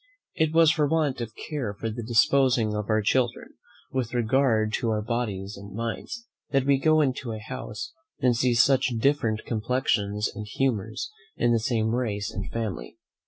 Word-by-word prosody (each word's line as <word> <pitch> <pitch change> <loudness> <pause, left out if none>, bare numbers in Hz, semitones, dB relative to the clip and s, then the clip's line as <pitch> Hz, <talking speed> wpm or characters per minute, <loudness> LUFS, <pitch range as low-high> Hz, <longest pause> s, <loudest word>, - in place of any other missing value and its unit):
It 160 -2 +2
is 165 -2 +7
for 150 -3 +2
want 150 -5 0
of 115 -1 -6
care 125 -10 -4
in 115 -1 -1
the 120 - -5
disposing 120 -1 +3
of 105 0 -3
our 110 -1 +2
children, 120 +2 0 0.4
with 125 -2 -2
regard 115 -2 +2
to 120 - -1
our 105 -1 0
bodies 105 -4 -3
and 100 0 -10
minds, 115 - -4 0.2
that 135 -2 +1
we 140 -1 +3
go 155 +2 +4
into 130 -4 -1
a - - -4
house 130 - -6 0.3
and 125 -2 +3
see 125 0 +2
such 130 +3 +4
different 115 -4 +1
complexions 105 -3 0
and 105 +1 -7
humours 110 -2 -2 0.2
in 120 - +2
the 115 - +3
same 110 -1 0
race 105 -5 -1
and 100 - -5
family. 100 - -4
115 Hz, 170 wpm, -26 LUFS, 110-135 Hz, 0.4 s, is